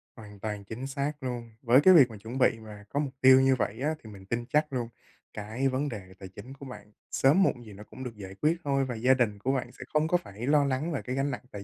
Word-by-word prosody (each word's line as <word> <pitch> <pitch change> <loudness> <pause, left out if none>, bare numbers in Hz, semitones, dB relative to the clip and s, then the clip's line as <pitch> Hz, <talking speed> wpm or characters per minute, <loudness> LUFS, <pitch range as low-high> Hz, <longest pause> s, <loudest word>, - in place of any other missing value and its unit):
Hoàn 105 -3 -12
toàn 105 -1 -4
chính 115 +6 -6
xác 140 +1 -3
luôn. 120 -2 -5
Với 125 +3 +5
cái 185 +4 +7
việc 140 -8 +7
mà 110 - -9
chuẩn 115 +5 -7
bị 115 -3 +3
mà 105 -2 -11
có 145 - -1
mục 140 -3 -2
tiêu 130 0 +8
như 135 0 +4
vậy 120 -1 -3
á, 155 +3 0
thì 110 - -11
mình 100 -2 -12
tin 120 +4 -3
chắc 150 +3 0
luôn 120 -3 -2 0.4
cái 110 +6 -2
vấn 135 +3 -1
đề 95 -6 -8
tài 95 - -9
chính 100 +8 -11
của 140 0 -11
bạn 125 -5 -11 0.2
sớm 150 +9 +4
muộn 120 -9 0
gì 105 - -11
nó 100 +2 -11
cũng 130 - -10
được 125 -3 -6
giải 95 -2 -9
quyết 155 +3 +2
thôi, 135 -2 +1
và 125 -2 -4
gia 125 +4 +4
đình 115 -6 0
của 125 +6 0
bạn 130 -3 -2
sẽ 125 - -10
không 155 +1 +2
có 180 - +3
phải 110 - -8
lo 145 0 +4
lắng 140 +5 -1
về 145 - -2
cái 130 - -4
gánh 135 +1 0
nặng - - -6
tài 100 -1 -7
125 Hz, 285 wpm, -28 LUFS, 110-140 Hz, 0.4 s, tiêu